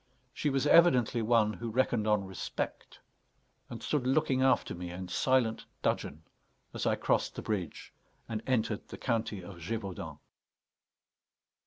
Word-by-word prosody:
She 150 Hz, -, 0 dB
was 135 Hz, 0 st, +1 dB
evidently 130 Hz, -8 st, +5 dB
one 110 Hz, -1 st, +3 dB
who 115 Hz, +1 st, -5 dB
reckoned 115 Hz, -2 st, +1 dB
on 105 Hz, -2 st, +2 dB
respect, 95 Hz, -1 st, -5 dB, 0.7 s
and -, -, -8 dB
stood 140 Hz, -5 st, 0 dB
looking 135 Hz, -1 st, +2 dB
after 130 Hz, 0 st, +3 dB
me 90 Hz, 0 st, -6 dB
in 90 Hz, +1 st, -6 dB
silent 120 Hz, +1 st, +1 dB, 0.2 s
dudgeon, 80 Hz, +2 st, -1 dB, 0.5 s
as -, -, -2 dB
I -, -, +3 dB
crossed -, -, 0 dB
the -, -, -5 dB
bridge 100 Hz, -6 st, -4 dB, 0.3 s
and 110 Hz, -2 st, -3 dB
entered 115 Hz, -4 st, 0 dB
the -, -, -8 dB
county 110 Hz, -5 st, -1 dB
of 90 Hz, 0 st, -10 dB
Gévaudan. 95 Hz, +2 st, -5 dB
115 Hz, 140 wpm, -31 LUFS, 100-130 Hz, 0.7 s, evidently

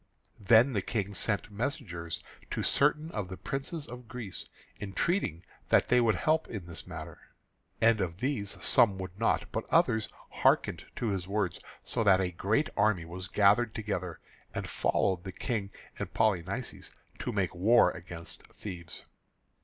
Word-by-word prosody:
Then 115 Hz, +6 st, +5 dB
the 100 Hz, -, +1 dB
King 100 Hz, -1 st, -2 dB
sent 105 Hz, +3 st, +1 dB
messengers 100 Hz, -, -3 dB, 0.3 s
to -, -, -2 dB
certain 150 Hz, +3 st, +3 dB
of 105 Hz, -4 st, -3 dB
the 95 Hz, 0 st, -7 dB
princes 140 Hz, +3 st, -4 dB
of 125 Hz, 0 st, -9 dB
Greece, 115 Hz, -7 st, -6 dB, 0.3 s
entreating 100 Hz, -, -1 dB, 0.3 s
that -, -, +4 dB
they 125 Hz, 0 st, +5 dB
would 115 Hz, -2 st, +3 dB
help 155 Hz, +1 st, +1 dB
in 100 Hz, -6 st, -6 dB
this 85 Hz, -3 st, -8 dB
matter. -, -, -8 dB, 0.6 s
And 115 Hz, -2 st, +4 dB
of 85 Hz, -2 st, -2 dB
these 110 Hz, -4 st, -2 dB
some 100 Hz, -5 st, +5 dB
would 95 Hz, +1 st, -7 dB
not, 115 Hz, -, +1 dB
but 110 Hz, -, -3 dB
others 125 Hz, -10 st, +3 dB, 0.2 s
hearkened -, -, +2 dB
to 120 Hz, -, -1 dB
his 95 Hz, -3 st, -2 dB
words, 100 Hz, -3 st, -1 dB, 0.2 s
so 115 Hz, -, -1 dB
that 95 Hz, -3 st, +6 dB
a 90 Hz, -1 st, 0 dB
great 105 Hz, -, +1 dB
army 100 Hz, -5 st, +2 dB
was 90 Hz, +3 st, -6 dB
gathered 105 Hz, +4 st, +4 dB
together 95 Hz, -6 st, -3 dB, 0.4 s
and -, -, -3 dB
followed 90 Hz, -3 st, +1 dB
the 95 Hz, -, -5 dB
King 105 Hz, -2 st, -2 dB, 0.3 s
and -, -, -4 dB
Polynices 105 Hz, -7 st, -1 dB, 0.3 s
to -, -, -2 dB
make 100 Hz, -5 st, 0 dB
war 110 Hz, +8 st, +5 dB
against 85 Hz, -2 st, -8 dB
Thebes. 85 Hz, -6 st, -8 dB
105 Hz, 155 wpm, -30 LUFS, 95-120 Hz, 0.6 s, that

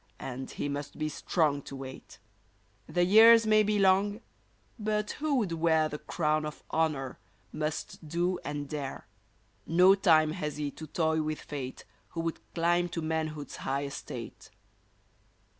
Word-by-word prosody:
And 130 Hz, 0 st, -6 dB
he -, -, -4 dB
must 145 Hz, 0 st, -5 dB
be 155 Hz, 0 st, -1 dB
strong 150 Hz, -1 st, 0 dB
to 140 Hz, -, -9 dB
wait! 135 Hz, -1 st, -9 dB, 0.7 s
The 175 Hz, 0 st, +2 dB
years 225 Hz, +4 st, +8 dB
may 215 Hz, 0 st, +5 dB
be 210 Hz, 0 st, +1 dB
long, 200 Hz, +2 st, +3 dB, 0.6 s
but 210 Hz, 0 st, -1 dB
who 300 Hz, -1 st, +1 dB
would 215 Hz, -9 st, 0 dB
wear 160 Hz, -1 st, +2 dB
The 150 Hz, -, -6 dB
crown 155 Hz, -1 st, 0 dB
of 150 Hz, 0 st, -7 dB
honor, 150 Hz, -5 st, -1 dB, 0.3 s
must 155 Hz, +1 st, -4 dB
do 175 Hz, +3 st, 0 dB
and 145 Hz, -1 st, -4 dB
dare! 140 Hz, -2 st, -5 dB, 0.6 s
No 180 Hz, +4 st, +6 dB
time 160 Hz, -6 st, +4 dB
has 150 Hz, -4 st, -4 dB
he 145 Hz, -1 st, -2 dB
to 155 Hz, -, -9 dB
toy 160 Hz, 0 st, +1 dB
with 155 Hz, 0 st, -3 dB
fate 135 Hz, -3 st, -7 dB, 0.3 s
Who 165 Hz, -, -2 dB
would 165 Hz, -1 st, -3 dB, 0.2 s
climb 175 Hz, +1 st, +2 dB
to 165 Hz, -1 st, -4 dB
manhood's 155 Hz, -2 st, -3 dB
high 140 Hz, +1 st, -2 dB
estate 140 Hz, -1 st, -7 dB
160 Hz, 150 wpm, -30 LUFS, 150-180 Hz, 0.7 s, years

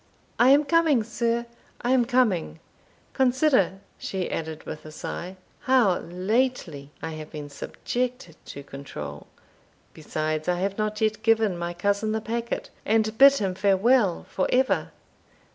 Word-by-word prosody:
"I 245 Hz, -, +6 dB
am 285 Hz, +2 st, +6 dB
coming, 315 Hz, -6 st, +3 dB
sir, 235 Hz, +1 st, -1 dB, 0.4 s
I 245 Hz, -, +1 dB
am 255 Hz, -2 st, +4 dB
coming 230 Hz, -11 st, +1 dB, 0.5 s
Consider," 260 Hz, -, +2 dB, 0.2 s
she 190 Hz, -2 st, -3 dB
added, 160 Hz, -1 st, -4 dB
with 155 Hz, -, -7 dB
a 155 Hz, -, -10 dB
sigh, 180 Hz, +4 st, -6 dB, 0.2 s
"how 245 Hz, -8 st, +3 dB
lately 180 Hz, -, -1 dB
I 160 Hz, -, -3 dB
have 155 Hz, -1 st, -8 dB
been 145 Hz, -1 st, -8 dB
subjected 245 Hz, -, -4 dB
to 140 Hz, -, -9 dB
control 75 Hz, -, -8 dB, 0.7 s
besides, 155 Hz, 0 st, -3 dB
I 180 Hz, 0 st, +1 dB
have 195 Hz, +2 st, -2 dB
not 215 Hz, 0 st, -2 dB
yet 215 Hz, -1 st, +1 dB
given 225 Hz, -4 st, +3 dB
my 170 Hz, 0 st, -4 dB
cousin 200 Hz, +4 st, 0 dB
the 220 Hz, -, 0 dB
packet, 235 Hz, +1 st, -4 dB
and 220 Hz, 0 st, +1 dB
bid 275 Hz, 0 st, +9 dB
him 195 Hz, -9 st, -1 dB
fare 195 Hz, +1 st, +2 dB
well 220 Hz, -3 st, +3 dB
for 185 Hz, -, -1 dB
ever. 260 Hz, +1 st, +2 dB
210 Hz, 145 wpm, -25 LUFS, 170-245 Hz, 0.7 s, bid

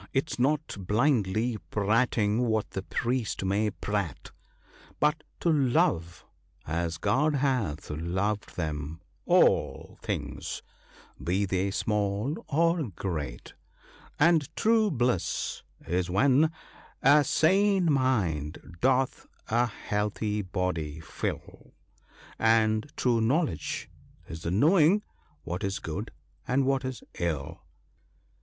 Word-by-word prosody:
— -, -, -38 dB
'tis 135 Hz, 0 st, -1 dB
not 150 Hz, +4 st, +1 dB
blindly 110 Hz, -1 st, +2 dB
prating 110 Hz, +1 st, +2 dB
what 110 Hz, -2 st, 0 dB
the 95 Hz, -, -3 dB
priest 120 Hz, +1 st, -2 dB
may 100 Hz, +3 st, +1 dB
prate, 100 Hz, -6 st, -4 dB, 0.7 s
But 150 Hz, +1 st, +2 dB, 0.2 s
to 170 Hz, -, +3 dB
love, 120 Hz, -, +1 dB, 0.4 s
as 85 Hz, +1 st, -2 dB
God 150 Hz, -, +2 dB
hath 125 Hz, -, 0 dB
loved 95 Hz, +7 st, -2 dB
them, 75 Hz, -1 st, -4 dB, 0.3 s
all -, -, +2 dB
things, -, -, -4 dB, 0.6 s
be 95 Hz, +4 st, +1 dB
they 95 Hz, +1 st, 0 dB
small 105 Hz, +7 st, -1 dB
of 160 Hz, -, +1 dB
great; 75 Hz, -11 st, -4 dB, 0.6 s
And 160 Hz, -2 st, +4 dB
true 220 Hz, -1 st, +3 dB
bliss 120 Hz, -, -1 dB, 0.3 s
is 90 Hz, +1 st, 0 dB
when 135 Hz, -, +4 dB, 0.5 s
a 145 Hz, +2 st, +7 dB
sane 190 Hz, +3 st, +3 dB
mind 90 Hz, -, -1 dB
doth 130 Hz, 0 st, +1 dB, 0.2 s
a 120 Hz, +2 st, +3 dB
healthy 105 Hz, 0 st, -2 dB
body 90 Hz, -5 st, -3 dB
fill; 80 Hz, -, -6 dB, 0.6 s
And 110 Hz, +3 st, +3 dB
true 120 Hz, -3 st, +2 dB
knowledge 120 Hz, -, 0 dB, 0.4 s
is 80 Hz, 0 st, -7 dB
the 85 Hz, -, -3 dB
knowing 165 Hz, -, +4 dB, 0.4 s
what 90 Hz, +4 st, -4 dB
is 100 Hz, 0 st, -1 dB
good 100 Hz, +8 st, -5 dB, 0.4 s
and 130 Hz, +2 st, +2 dB
what 135 Hz, 0 st, +1 dB
is 130 Hz, -3 st, -5 dB, 0.2 s
ill." 80 Hz, 0 st, -2 dB
110 Hz, 110 wpm, -28 LUFS, 90-135 Hz, 0.7 s, a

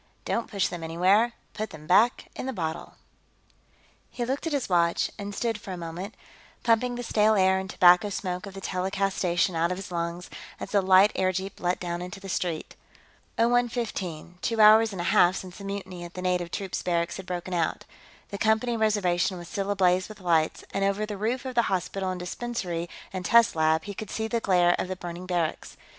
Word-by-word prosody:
Don't 230 Hz, -, -1 dB
Push 200 Hz, -3 st, 0 dB
Them 175 Hz, -2 st, -6 dB
Anywhere 190 Hz, +8 st, +3 dB, 0.2 s
Put 215 Hz, +1 st, -4 dB
Them 155 Hz, -1 st, -11 dB
Back 210 Hz, +8 st, +3 dB
in -, -, -5 dB
the 265 Hz, -, -2 dB
Bottle 160 Hz, -4 st, -4 dB, 1.1 s
He 240 Hz, -, -3 dB
looked 270 Hz, +6 st, -2 dB
at -, -, -2 dB
his 280 Hz, -3 st, -1 dB
watch, 170 Hz, -2 st, +2 dB
and 200 Hz, 0 st, -5 dB
stood 225 Hz, -2 st, -2 dB
for 190 Hz, -, -6 dB
a -, -, -5 dB
moment, 175 Hz, +5 st, -6 dB, 0.5 s
pumping 245 Hz, +2 st, +2 dB
the 245 Hz, -, -4 dB
stale 215 Hz, -1 st, +3 dB
air 190 Hz, -1 st, +4 dB
and 190 Hz, 0 st, -6 dB
tobacco 180 Hz, +3 st, +5 dB
smoke 185 Hz, 0 st, -4 dB
of 195 Hz, -, -10 dB
the 195 Hz, -, -7 dB
telecast 195 Hz, +1 st, -1 dB
station 175 Hz, 0 st, +1 dB
out 165 Hz, +1 st, +2 dB
of 180 Hz, -, -2 dB
his 195 Hz, -1 st, -8 dB
lungs, 170 Hz, +1 st, -4 dB, 0.3 s
as -, -, -6 dB
the 200 Hz, -, +3 dB
light 190 Hz, +2 st, +6 dB
airjeep 190 Hz, +1 st, -1 dB
let 180 Hz, 0 st, 0 dB
down 175 Hz, -1 st, -3 dB
into 180 Hz, +3 st, -7 dB
the 195 Hz, 0 st, -9 dB
street. 170 Hz, -3 st, -3 dB, 0.6 s
Oh 230 Hz, -, +4 dB
one 245 Hz, 0 st, +3 dB
fifteen 180 Hz, -8 st, -5 dB
two 230 Hz, -1 st, -1 dB
hours 215 Hz, +1 st, +7 dB
and 190 Hz, -, -7 dB
a 175 Hz, -, 0 dB
half 175 Hz, +2 st, +5 dB
since 185 Hz, 0 st, -7 dB
the -, -, -9 dB
mutiny 195 Hz, -3 st, -6 dB
at 175 Hz, 0 st, -10 dB
the 180 Hz, -, -5 dB
native 180 Hz, -1 st, 0 dB
troops 190 Hz, +1 st, -4 dB
barracks 170 Hz, -1 st, -1 dB
had 190 Hz, -1 st, -9 dB
broken 180 Hz, 0 st, -4 dB
out. 165 Hz, -2 st, -1 dB, 0.4 s
The 200 Hz, -, -6 dB
Company 220 Hz, +2 st, +2 dB
reservation 195 Hz, -4 st, +1 dB
was 175 Hz, -1 st, -9 dB
still 200 Hz, -3 st, -3 dB
ablaze 185 Hz, -1 st, +2 dB
with 215 Hz, -1 st, -11 dB
lights, 165 Hz, -4 st, +1 dB
and 195 Hz, -, 0 dB
over 200 Hz, +2 st, +1 dB
the 210 Hz, -1 st, -5 dB
roof 235 Hz, +6 st, -2 dB
of 260 Hz, -, -4 dB
the 240 Hz, -, +4 dB
hospital 190 Hz, +1 st, -1 dB
and 185 Hz, -1 st, -3 dB
dispensary 180 Hz, -3 st, -4 dB, 0.2 s
and 185 Hz, -1 st, -4 dB
test 230 Hz, +1 st, +5 dB
lab 160 Hz, 0 st, +2 dB
he 205 Hz, -, -6 dB
could 205 Hz, +1 st, -7 dB
see 220 Hz, 0 st, -2 dB
the 235 Hz, +1 st, 0 dB
glare 180 Hz, -4 st, +3 dB
of -, -, -1 dB
the 185 Hz, -, -3 dB
burning 175 Hz, 0 st, -7 dB
barracks. 175 Hz, -3 st, -2 dB
190 Hz, 210 wpm, -27 LUFS, 175-215 Hz, 1.1 s, hours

